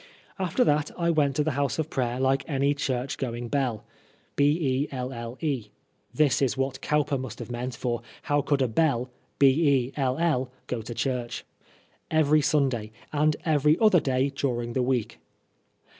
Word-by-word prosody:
After 190 +6 +2
that 150 -8 +2
I 170 -1 +2
went 145 -4 +2
to 150 - +2
the 155 - 0
house 140 0 -1
of 160 0 -2
prayer 125 -1 -1
like 135 +1 +2
any 140 -2 +1
church 135 -2 -2
going 120 -2 -3
belle 125 -6 -1 0.5
(this 145 -1 +2 1.5
is 135 -1 +1
what 135 0 -2
Cowper 150 -2 +1
must 125 -4 -6
have - - -7
meant, 125 +1 -4
for 120 -1 -2 0.2
how 145 0 +1
could 140 -1 0
Koell 135 +1 +1 0.2
go 120 -2 -3
to 110 +2 -7
church 125 -2 -2 0.3
?) - - -33 0.2
every 155 -1 +4
Sunday, 130 -7 +1 0.2
and 150 +1 +2
every 150 0 +3
other 215 -5 +6
day 135 -1 0
during 120 -4 -2
the 130 - +1
week. 125 -3 -1
135 Hz, 145 wpm, -26 LUFS, 125-150 Hz, 1.5 s, other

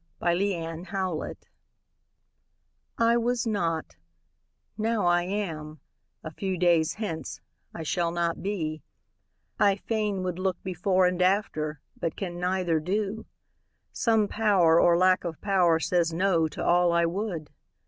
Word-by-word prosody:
Y 175 0 +2
Z 200 +1 0
The 165 -1 -5
Mystery 185 -3 -3 1.6
I 230 +1 +4
WAS 240 +1 0
not; 165 - -2 0.8
now 220 -1 0
I 175 0 +4
am 165 -5 -4 0.4
a 155 - -6
few 190 +2 -3
days 170 -2 +3
hence, 205 -8 -5 0.4
I 165 - -5
shall 170 +2 0
not 170 0 -1
be; 160 -6 -3 0.8
I 200 -1 +4
fain 210 -2 -2
would 180 -1 -3
look 185 -1 0
before 185 +1 +1
And 180 0 0
after, 155 -6 0 0.2
but 165 - -2
can 175 -3 -5
neither 180 -2 0
do; 205 +6 -2 0.7
some 220 -3 +2
Pow'r 190 -7 +3
Or 170 -1 +5
lack 185 +1 +3
of 165 -3 -5
pow'r 180 -5 +3
says 170 0 +1
"no" 170 -1 +2
to 155 - -6
all 175 0 +4
I 170 0 +3
would. 175 -3 -3
180 Hz, 140 wpm, -27 LUFS, 165-200 Hz, 1.6 s, Or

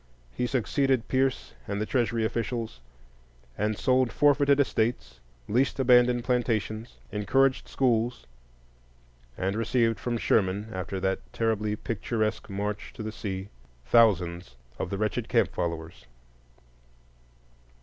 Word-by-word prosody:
He 125 - -1
succeeded 130 0 +1
Pierce 130 0 0
and 100 - -2
the 105 - -1
Treasury 115 -2 0
officials, 115 - -3 0.8
and 105 0 -1
sold 130 -1 +2
forfeited 145 -1 +4
estates, 110 - 0 0.3
leased 130 +5 +1
abandoned 125 -1 +5
plantations, 115 -2 -1
encouraged 130 +6 +2
schools, 120 - 0 1.1
and 95 +2 -1
received 115 -1 +1
from 120 -1 -2
Sherman, 100 -1 +1
after 95 +1 -4
that 95 0 0
terribly 110 -2 0
picturesque 110 0 -2
march 100 +1 -4
to - - -6
the 110 - -4
sea, 95 -2 -5 0.4
thousands 90 - +3 0.2
of - - -2
the 100 - -3
wretched 105 +1 -2
camp - - +2
followers. 85 -3 -4
110 Hz, 115 wpm, -27 LUFS, 100-125 Hz, 1.1 s, abandoned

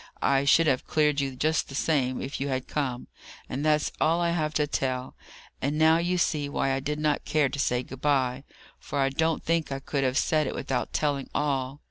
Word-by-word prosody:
I 135 0 +2
should 165 +4 +5
have 135 -4 +1
cleared 150 -2 +2
you 135 -2 -3
just 155 +5 0
the 135 - -7
same, 135 -4 0
if 135 0 -5
you 140 - -1
had 130 -1 -2
come." 130 -5 -2 0.4
"And 135 +3 -4
that's 150 -1 +2
all 165 +2 +3
I 170 -1 +1
have 155 -3 0
to 150 - +2
tell. 130 -3 -2 0.5
And 145 +3 -1
now 160 +1 +5
you 175 +1 0
see 150 -4 0
why 135 - 0
I 135 - 0
did 150 +2 -3
not 150 -1 0
care 150 -3 +1
to 140 - -5
say 125 -2 +1
'Good 130 +1 -10
bye,' 135 -3 +1 0.4
for - - -5
I 135 -1 +3
don't 160 +4 0
think 165 -3 0
I 135 - -1
could 140 0 -2
have 130 0 +1
said 155 -3 +2
it - - -4
without 130 -2 -2
telling 145 -3 -1
all. 135 -1 -1
140 Hz, 220 wpm, -27 LUFS, 135-155 Hz, 0.5 s, should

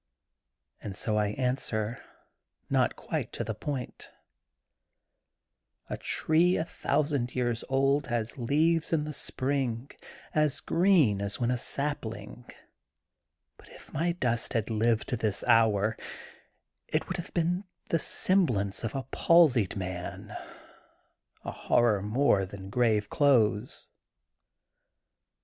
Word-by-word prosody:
* - - -58
' - - -47
And 100 - -6
so 105 +2 0
I 105 -1 +2
answer, 120 -1 -2 0.7
not - - +2
quite - - -4
to - - -3
the 110 - -3
point: 130 +3 -6 1.8
"A - - -2
tree 170 +3 +2
a - - 0
thousand 145 -6 -1
years 120 -2 -1
old 135 +2 +2
has 120 -2 -2
leaves 155 +6 +1
in 155 -2 +2
the 150 0 -5
spring, 130 -3 -2 0.4
as 150 -2 +2
green 165 - +3
as 100 0 -2
when 120 0 +1
a 125 - +1
sapling. 120 -6 -3 1.1
But - - -18
if - - -15
my 170 +4 0
dust 120 -8 0
had 115 -1 -1
lived 110 0 +1
to 125 - -1
this 110 -2 -1
hour, 110 -1 +4 0.9
it - - 0
would 185 - -3
have 175 - -7
been 175 +3 0 0.2
the 165 - +2
semblance 125 - +1
of 115 - -3
a 135 - -2
palsied 145 - +4
man, 90 -2 -6 1.1
a - - -3
horror 110 -4 +2
more 105 -1 +2
than 95 0 -9
grave 110 -3 +2
clothes. 110 -6 +2
125 Hz, 125 wpm, -29 LUFS, 110-150 Hz, 1.8 s, hour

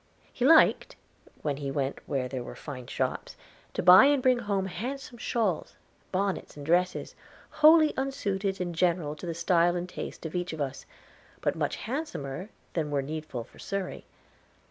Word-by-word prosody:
He 250 - -1
liked, 320 +1 +5 0.5
when 145 -2 -1
he 140 -1 -4
went 135 0 -2
where 130 -2 -1
there 130 -1 -4
were 120 - -8
fine 125 -5 -8
shops, - - -3 0.4
to - - -1
buy 185 +7 +9
and 285 0 +4
bring 255 -1 +4
home 200 -3 -1
handsome 245 +5 -6
shawls, 215 -9 -1 0.4
bonnets, 195 -4 -2
and 145 - -8
dresses, 180 +3 +1 0.5
wholly 310 0 +7
unsuited 200 -8 -2
in 175 -1 -2
general 165 -3 +1
to 165 +4 -8
the 165 - -3
style 170 0 +3
and 175 0 -3
taste 180 - -7
of 160 - -5
each 180 -2 -2
of 160 - -7
us, 140 -1 -4 0.5
but - - 0
much - - -1
handsomer 215 - -5 0.2
than 155 -3 -1
were 140 -2 0
needful 150 -4 -5
for - - -20
Surrey. 195 -2 -4
180 Hz, 165 wpm, -28 LUFS, 150-210 Hz, 0.5 s, buy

